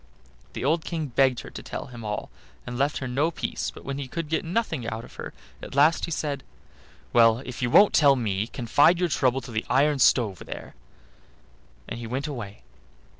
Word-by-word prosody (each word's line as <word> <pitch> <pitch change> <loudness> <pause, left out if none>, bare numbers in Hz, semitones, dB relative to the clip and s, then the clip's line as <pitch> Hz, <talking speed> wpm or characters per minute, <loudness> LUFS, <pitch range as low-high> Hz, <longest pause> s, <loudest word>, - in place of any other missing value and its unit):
The - - -4
old 160 +3 +2
King 160 -4 -3
begged 130 0 +2
her - - -11
to - - -8
tell - - -6
him 120 -2 -10
all, 105 -1 -4 0.3
and 125 - -6
left 140 +4 0
her 130 - -4
no 140 +6 +1
peace, 170 - -3
but - - -13 0.2
he 140 - -4
could 160 +3 -5
get 160 - 0
nothing 165 - -2
out 115 0 -4
of - - -16
her. - - -6 0.3
At - - -8
last 150 +4 +4
he - - -8
said: 145 -4 -3 0.7
"Well, 115 +1 +5
if 125 0 -7
you 120 - +1
won't 205 +11 +6
tell 140 -3 +6
me, 105 -4 -1
confide 145 +9 +3
your 180 -1 +1
trouble 135 -3 +1
to 120 - -10
the 110 0 -1
iron 140 +2 +3
stove 110 -6 +3
there," - - -8 1.1
and - - -5
he 115 - -6
went 130 +5 -3
away. 115 -9 -7
130 Hz, 200 wpm, -26 LUFS, 120-150 Hz, 1.1 s, won't